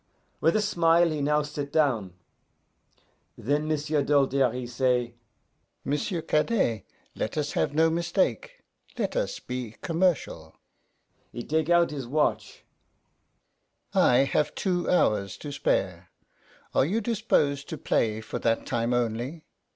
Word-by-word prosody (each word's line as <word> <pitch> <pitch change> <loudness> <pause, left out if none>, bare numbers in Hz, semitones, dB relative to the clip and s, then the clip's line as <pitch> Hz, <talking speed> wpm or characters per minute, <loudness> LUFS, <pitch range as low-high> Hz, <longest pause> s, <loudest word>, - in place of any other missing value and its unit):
With 165 - +2
a 215 - +2
smile 170 -3 +3
he 150 -2 -2
now 150 +1 +2
sit 145 -1 -5
down. 115 - +1 1.2
Then 145 +6 -1
M'sieu' 150 -1 0
Doltaire, 135 -3 +2
he 125 +1 -5
say, 125 -1 0 0.7
'M'sieu' 160 +4 -2
Cadet, 150 - +1 0.3
let 110 - -4
us 150 -1 -1
have 145 - -1
no 160 +1 +4
mistake 170 - -1 0.3
let - - -2
us - - -2
be 125 -3 -6
commercial.' 165 - -1 0.8
He 120 - -6
take 155 +3 -1
out 175 -1 +4
his 135 -5 -5
watch. 150 +4 -1 1.3
'I 125 - +4
have 145 +2 0
two 180 -3 -1
hours 100 - +1
to 145 - -7
spare; 95 -9 -1 0.6
are - - +4
you 190 +11 0
dispose 205 - +1
to 160 - -6
play 110 -4 0
for 105 - -5
that 115 -1 0
time 120 0 0
only? 120 +7 -2
145 Hz, 130 wpm, -27 LUFS, 120-160 Hz, 1.3 s, no